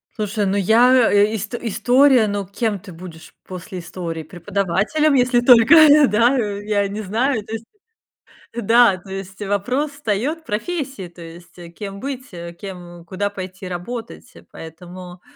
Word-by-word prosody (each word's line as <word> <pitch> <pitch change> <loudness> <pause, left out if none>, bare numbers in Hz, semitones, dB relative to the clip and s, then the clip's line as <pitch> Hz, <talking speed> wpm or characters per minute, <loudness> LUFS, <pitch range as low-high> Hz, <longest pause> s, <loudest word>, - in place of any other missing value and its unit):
Слушай, 210 -1 -2
ну, 195 +1 0
я, 235 +5 +4
э, 205 +2 +3
ист 220 +3 -4
история 245 +1 +3
Ну, 200 -1 -3
кем 205 +1 -3
ты 190 0 -13
будешь 165 -1 -12
после 185 0 -8
истории? 170 -2 -6
Преподавателем, 200 - -1
если 250 -2 +3
только, 240 +3 +6
э, 300 -2 +7
да, 235 +5 +3
я 205 -2 -1
не 210 +2 -5
знаю, 220 +3 -1
то 220 - -9
есть 225 0 -6 0.9
Да, 230 -3 +4
то 190 +2 -15
есть, 195 +1 -8
вопрос 245 +9 -2
встаёт 280 +5 -3
профессии, 265 - -4
то 170 0 -14
есть, 170 +2 -13 0.2
кем 200 0 -8
быть, 260 -1 -6
э, 170 0 -8
кем 175 -2 -10
куда 200 +3 -3
пойти 185 -1 -8
работать, 225 +7 -7
э, - - -15
поэтому, 175 +2 -11
205 Hz, 150 wpm, -20 LUFS, 185-245 Hz, 0.9 s, э